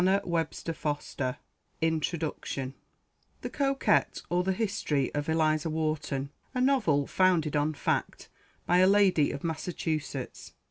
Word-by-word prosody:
[Illustration: 170 -3 0
Eliza 145 -3 -2 0.4
Wharton] 155 -4 -2 0.7
THE - - -4
COQUETTE; 275 -1 +1
OR, 175 +1 +2
THE 190 - +1
HISTORY 185 - -1
OF 145 +1 -2
ELIZA 155 0 +2
WHARTON. 155 -3 -2 0.2
A - - 0
NOVEL: 225 - +3
FOUNDED 170 -5 +2
ON 150 +1 +1
FACT. - - -2 0.4
BY 175 - +3
A 185 - +6
LADY 195 -6 +4
OF - - -5
MASSACHUSETTS. 160 -4 -3
160 Hz, 120 wpm, -29 LUFS, 145-185 Hz, 0.7 s, A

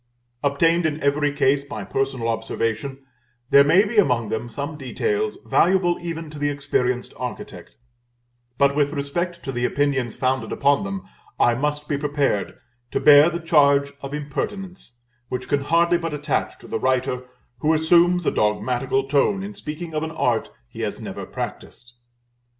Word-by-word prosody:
Obtained 165 +4 +2
in 155 0 -3
every 145 +1 +2
case 140 -1 +2
by 145 0 -6
personal 135 -3 -2
observation, 115 +4 -3 0.5
there 140 - +8
may 175 +8 +5
be 215 +2 -4
among 125 - +2
them 110 +2 -3
some 145 +6 -5
details 420 - -2
valuable 175 -1 +3
even 165 -2 -5
to 150 - -9
the 145 0 +1
experienced 130 -3 -1
architect; 125 -1 -7 0.8
but 140 0 +3
with 145 0 +1
respect 170 +5 -3
to 135 - -4
the 120 -1 -3
opinions 135 -3 0
founded 130 0 -1
upon 140 +6 +2
them 195 -1 -5 0.3
I 120 - +4
must 150 +3 -2
be 145 -2 -1
prepared 145 -7 -1 0.3
to - - -1
bear 145 +2 +7
the 170 0 -4
charge 140 -4 +3
of 140 - -6
impertinence 150 +1 -5 0.3
which 125 0 -4
can 145 - +1
hardly 170 +4 +3
but 165 -3 -3
attach 150 0 -2
to - - -12
the - - -3
writer 130 -1 0 0.3
who 155 - +2
assumes 170 +2 +4
a - - +2
dogmatical 125 +5 0
tone 150 +8 +2
in 205 +1 -6
speaking 160 -1 -7
of 155 - -1
an 160 - -3
art 125 -8 0 0.2
he - - -9
has - - -3
never - - -7
practised. 120 0 -7
145 Hz, 160 wpm, -23 LUFS, 135-165 Hz, 0.8 s, there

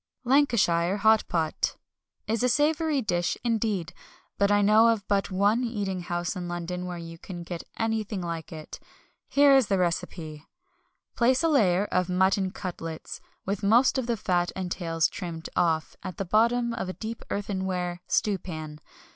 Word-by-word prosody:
Lancashire 215 -10 +3
Hot 220 +1 +4
Pot 160 -2 -1 0.5
is 225 0 -1
a 250 - +3
savoury 300 +1 +2
dish 175 -4 0
indeed; 215 -7 -1 0.5
but 200 0 +3
I 205 0 +4
know 215 +3 +6
of 225 -4 +1
but 200 -1 +1
one 205 +5 +2
eating 200 -6 -2
house 175 0 -3
in 180 -1 -4
London 175 +1 -4
where 180 -1 -5
you 165 -1 -9
can 175 -1 -8
get 170 0 -6
anything 220 -2 -1
like 170 -2 -5
it. 155 -2 -8 0.5
Here 280 -1 +5
is 265 -5 +4
the 195 - +1
recipe 165 -3 -2 0.7
Place 255 +5 +3
a 330 - +3
layer 205 - +3
of 180 -2 0
mutton 190 +1 +2
cutlets, 170 -4 -6 0.2
with 200 +1 -2
most 235 +6 +4
of 245 - -3
the 235 -1 0
fat 175 -3 0
and 185 -2 -4
tails 165 -3 +1
trimmed 165 -4 -6
off, 165 -3 +1
at 185 -2 -7
the 195 - -2
bottom 235 +5 +2
of 230 -5 -4
a - - -3
deep 225 +3 -6
earthenware 185 -3 -2
stewpan. 160 -7 -2
190 Hz, 165 wpm, -27 LUFS, 175-225 Hz, 0.7 s, know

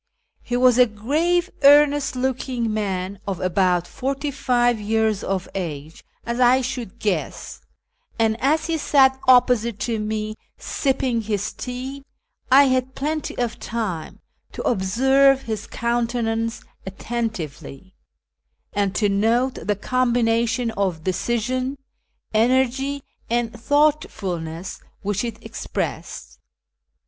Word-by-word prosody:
He 245 - -3
M'as 250 0 +4
a 250 - +7
grave, 315 - 0
earnest 290 -1 +5
looking 250 -3 -1
man 195 -2 -2
of 195 -3 -2
about 180 -1 +1
forty 275 +6 -3
five 245 -3 +1
years 220 -1 0
of 190 -1 -2
age, 160 -4 -6 0.2
as 235 +1 -3
I 255 +1 +5
should 250 -5 -5
guess; 195 -7 -3 0.6
and 225 -1 +2
as 310 +4 +2
he 325 -1 -1
sat 265 -2 +4
opj)Osite 245 -3 +4
to 225 +1 -2
me 215 0 -3 0.2
sipping 260 -4 -1
his 205 -2 -2
tea, 260 +2 -6 0.5
I 275 +2 +8
had 260 -1 0
plenty 305 +2 -3
of 240 -2 -2
time 205 -9 -4 0.3
to - - -5
observe 265 +7 +3
his 215 -2 -4
countenance 230 -1 -1 0.2
attentively, 190 - -5 0.8
and 200 -1 0
to 210 - +2
note 225 +6 +2
the 205 - +2
combination 235 0 +1
of 185 -7 -2
decision, 240 - -1 0.6
energy, 260 +4 +1 0.3
and 235 0 0
thought 290 +6 +2
fulness 175 -3 -5 0.2
which 205 +1 -1
it 235 -1 -4
expressed. - - -5
235 Hz, 115 wpm, -22 LUFS, 205-260 Hz, 0.8 s, I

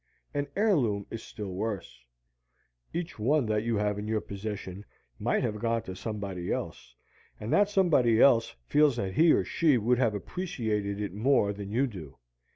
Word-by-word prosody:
An 145 0 -1
heirloom 135 - +2
is 115 - -5
still 100 -4 -7
worse. 95 - -4 0.9
Each 170 -6 -5
one 135 +5 +2
that 105 -1 0
you 115 +1 -1
have 105 0 0
in 105 - -5
your 110 0 +1
possession 100 -2 -6 0.4
might - - +1
have 105 0 -2
gone 115 0 0
to 95 - -7
somebody 100 -3 -4
else, - - -5 0.4
and 105 - -3
that 205 0 +4
somebody 150 - +3
else 115 - +5
feels 150 - +4
that 95 -5 -3
he 165 - +5
or - - +3
she 155 -6 +3
would 120 +2 +2
have 115 -5 +2
appreciated 105 - -3
it 105 -4 -3
more 105 -1 +2
than 100 -1 -7
you 120 +6 +2
do. 80 - -9
110 Hz, 170 wpm, -29 LUFS, 100-135 Hz, 0.9 s, else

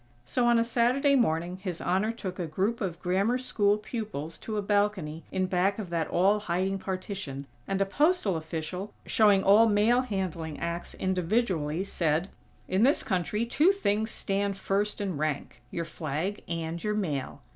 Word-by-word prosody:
So, 240 - +1
on 240 0 +5
a 230 - +4
Saturday 250 +4 +3
morning 175 -6 +1
His 185 -3 -5
Honor 195 +5 +1
took 195 -5 -6
a 175 - -2
group 195 +9 -1
of 175 -4 -3
Grammar 195 +7 +2
School 210 -5 +2
pupils 210 - -5
to 215 -1 -4
a - - +1
balcony 200 -6 0
in 185 0 0
back 185 +2 +1
of 200 -6 -6
that 165 -2 0
all 195 +4 +3
hiding 190 0 -1
partition, 185 -8 -5 0.2
and 195 0 -1
a 195 - +3
postal 290 - +2
official, 165 +5 -5
showing 205 -3 +4
all 210 +4 +6
mail 220 +4 +4
handling 185 - -3
acts 170 +1 -4
individually, 185 -3 0
said: 170 -1 0 0.4
"In 190 +2 +1
this 270 +5 +4
country, 200 +4 -1
two 295 +10 +4
things 220 - 0
stand 200 -1 0
first 205 +2 -1
in 190 -6 -2
rank: 145 -5 -3
your 170 +5 -3
flag 160 +7 -3
and 165 0 -4
your 210 -1 0
mail. 150 -11 -3
195 Hz, 170 wpm, -28 LUFS, 170-215 Hz, 0.4 s, all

